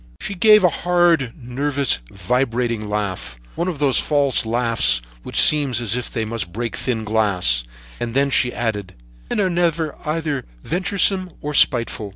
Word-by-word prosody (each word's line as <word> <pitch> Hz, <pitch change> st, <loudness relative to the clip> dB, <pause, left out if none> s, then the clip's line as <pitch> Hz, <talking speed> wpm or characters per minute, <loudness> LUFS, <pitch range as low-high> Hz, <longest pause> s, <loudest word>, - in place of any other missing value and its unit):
"She -, -, -4 dB
gave 210 Hz, +2 st, +6 dB
a 180 Hz, -, +6 dB
hard, 175 Hz, -7 st, +2 dB
nervous, 135 Hz, -, -1 dB
vibrating 115 Hz, +1 st, -1 dB
laugh; 95 Hz, -13 st, -4 dB
one 170 Hz, -, -2 dB
of 175 Hz, -5 st, -3 dB
those 140 Hz, -3 st, +3 dB
false 140 Hz, -6 st, +1 dB
laughs 115 Hz, -, +1 dB, 0.2 s
which -, -, -2 dB
seem 150 Hz, -2 st, +5 dB
as 120 Hz, -3 st, 0 dB
if 125 Hz, -, -3 dB
they 110 Hz, -1 st, -3 dB
must 110 Hz, -5 st, -4 dB
break 115 Hz, +3 st, -4 dB
thin 115 Hz, -4 st, -2 dB
glass, 100 Hz, -, +1 dB, 0.4 s
and 120 Hz, 0 st, -4 dB
then 140 Hz, 0 st, +2 dB
she 125 Hz, -2 st, +2 dB
added: 105 Hz, -6 st, -3 dB, 0.3 s
'Men -, -, -1 dB
are 195 Hz, -, +2 dB
never 170 Hz, -3 st, 0 dB
either 150 Hz, -3 st, -2 dB, 0.2 s
venturesome 185 Hz, +1 st, 0 dB
or 150 Hz, 0 st, -5 dB
spiteful.' 115 Hz, -7 st, +2 dB
125 Hz, 160 wpm, -20 LUFS, 110-155 Hz, 0.4 s, gave